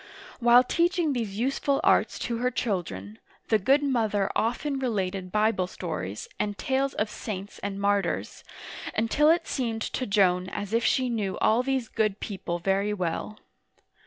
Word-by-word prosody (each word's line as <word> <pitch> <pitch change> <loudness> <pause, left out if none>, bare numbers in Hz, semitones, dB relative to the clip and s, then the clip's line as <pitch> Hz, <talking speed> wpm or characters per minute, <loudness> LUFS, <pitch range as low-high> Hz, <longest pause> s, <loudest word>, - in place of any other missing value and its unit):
While 240 0 +7
teaching 340 +2 +1
these 220 -6 -3
useful 275 +3 +1
arts - - +3
to 235 - -2
her 250 +2 +1
children, 115 - -3 0.3
the 220 - +4
good 275 +9 +3
mother 220 -7 +1
often 270 +5 0
related 195 -7 -2
Bible 210 -3 +2
stories, 130 - -5
and 205 -1 -1
tales 270 +1 0
of 215 - 0
saints 205 -2 -6
and 200 0 -4
martyrs, 200 0 0 0.5
until 255 +8 +3
it 335 +2 +3
seemed 230 -4 -2
to 255 - -3
Joan 185 -3 +3
as 205 +2 -5
if 230 0 +2
she 260 +2 +2
knew 210 -5 -2
all 225 +3 +3
these 260 -2 -1
good 215 -3 0
people 185 -4 -4
very 195 +3 0
well. 185 +3 -3
215 Hz, 155 wpm, -27 LUFS, 195-250 Hz, 0.5 s, While